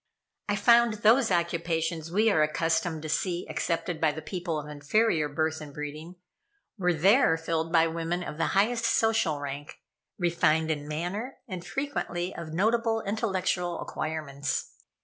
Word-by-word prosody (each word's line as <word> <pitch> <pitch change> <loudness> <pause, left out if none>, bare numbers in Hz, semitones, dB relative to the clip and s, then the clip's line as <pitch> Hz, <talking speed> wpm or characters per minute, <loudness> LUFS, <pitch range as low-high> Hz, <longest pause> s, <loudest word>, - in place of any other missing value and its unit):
I 205 - +2
found 235 +2 +5
those 225 +3 +4
occupations 170 -2 -1
we 215 +4 +3
are 155 - +3
accustomed 165 +1 0
to - - -4
see 175 +3 -1
accepted 170 0 -2
by 160 -2 +4
the 155 +1 -8
people 175 -3 -3
of 150 - -8
inferior 150 +2 +1
birth 155 +2 -1
and 150 -1 -8
breeding, 150 +4 -7 0.6
were 180 -4 +1
there 180 - +4
filled 165 0 -2
by 165 -1 +5
women 165 +2 -2
of 150 -2 -7
the 165 - +2
highest 230 +4 +2
social 225 -10 +2
rank, 145 +1 -6 0.4
refined 165 -3 +2
in 145 -1 -3
manner 180 - -4
and 185 -5 -6
frequently 190 -11 -3
of 170 -2 -7
notable 225 +5 +1
intellectual 190 -4 -1
acquirements. 145 -3 -3
170 Hz, 150 wpm, -28 LUFS, 155-200 Hz, 0.6 s, found